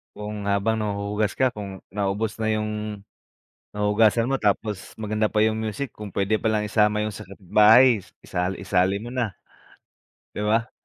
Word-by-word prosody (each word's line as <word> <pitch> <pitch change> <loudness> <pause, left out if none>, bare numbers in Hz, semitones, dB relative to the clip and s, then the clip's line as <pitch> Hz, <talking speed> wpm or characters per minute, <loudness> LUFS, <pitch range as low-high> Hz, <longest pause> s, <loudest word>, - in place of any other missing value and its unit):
Kung 105 0 -6
habang 100 +3 +1
nahuhugas 105 0 -1
ka, 130 -1 +2
kung 100 -4 -8
naubos 100 +3 -2
na 110 - -2
yung 105 -1 -3 0.7
huhugasan 110 +4 +2
mo, 135 - +1
tapos 105 -1 -1
maganda 110 0 -1
pa 105 0 +1
yung 110 0 +2
music 110 +4 -3
kung 105 -3 -10
pwede 100 +2 +1
pa - - -4
lang 110 -1 +2
isama 105 -1 +3
yung 110 - -2
sa 105 -1 -9
kabit-bahay 105 +5 +5
is 95 - -13 0.2
isa 90 +2 -2
isali 95 +1 0
mo 120 - -7
na, 120 -7 -2 1.0
'di - - -7
ba? 115 +2 +1
105 Hz, 165 wpm, -24 LUFS, 100-110 Hz, 1.0 s, kabit-bahay